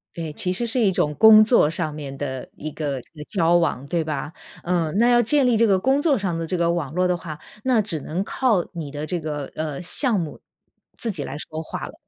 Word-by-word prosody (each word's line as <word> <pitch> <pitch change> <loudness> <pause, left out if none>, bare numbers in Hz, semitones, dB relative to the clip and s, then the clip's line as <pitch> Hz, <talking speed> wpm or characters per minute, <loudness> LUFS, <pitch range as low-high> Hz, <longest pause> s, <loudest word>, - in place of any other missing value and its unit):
对， 160 -3 -5
其 180 - -2
实 235 +6 -1
是 230 - +1
一 205 -4 +3
种 150 -4 0
工 220 +2 +8
作 215 -9 +4
上 160 -2 -3
面 145 -2 -7
的 130 -2 -5
一 155 - -5
个， 150 -2 -3
呃， 150 +4 -11
交 175 -4 +2
往， 165 -6 +1
对 170 +1 0
吧？ 150 0 -4 0.3
嗯， 170 -3 0
那 235 +3 +4
要 240 0 +5
建 270 +3 +3
立 245 - +3
这 230 +1 +4
个 195 -3 +3
工 265 +8 +2
作 290 -3 +2
上 190 -5 -2
的 165 - -3
这 180 +3 -2
个 170 0 +1
网 165 -5 -2
络 180 +1 +1
的 180 - +1
话， 160 -3 -8 0.2
那 255 -4 +3
只 170 -7 -3
能 165 +7 -3
靠 225 -5 +1
你 160 -5 -6
的 150 +1 -5
这 175 +1 -3
个， 150 -2 -4
呃， 155 0 -4
项 215 - +3
目 160 -3 -6 0.6
自 235 - -2
己 155 -7 -4
来 145 - -6
说 155 +1 -4
话 - - -6
了， - - -11
170 Hz, 260 characters per minute, -22 LUFS, 155-215 Hz, 0.6 s, 工